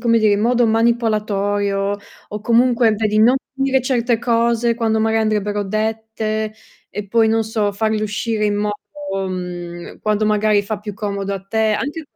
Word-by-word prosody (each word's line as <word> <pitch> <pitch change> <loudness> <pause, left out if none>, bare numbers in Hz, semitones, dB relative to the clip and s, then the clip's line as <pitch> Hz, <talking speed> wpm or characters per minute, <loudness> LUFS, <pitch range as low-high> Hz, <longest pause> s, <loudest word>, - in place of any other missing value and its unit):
come 230 -1 +3
dire, 215 -2 +3
in 205 - +1
modo 240 +1 +3
manipolatorio 205 -3 +1 0.3
o 210 0 -5
comunque, 235 0 +3
vedi, 215 0 0
non 240 +5 +5 0.2
dire 270 -1 +1
certe 240 -2 +1
cose 235 0 +1
quando 225 -2 0
maga 225 0 +2
andrebbero 210 -1 0
dette, 215 +1 -2 0.4
e 210 0 -6
poi 225 +2 +3
non 225 0 +2
so, 215 -2 0
farle 215 +1 0
uscire 215 +1 -1
in 205 0 0
modo 205 0 -4
mhmm, 175 -1 -6
quando 215 0 +1
magari 210 -1 +3
fa 205 +1 -4
più 210 -2 -6
comodo 200 -2 -3
a 195 - -5
te 220 +1 +1
anche 295 +7 -3
215 Hz, 165 wpm, -19 LUFS, 205-230 Hz, 0.4 s, non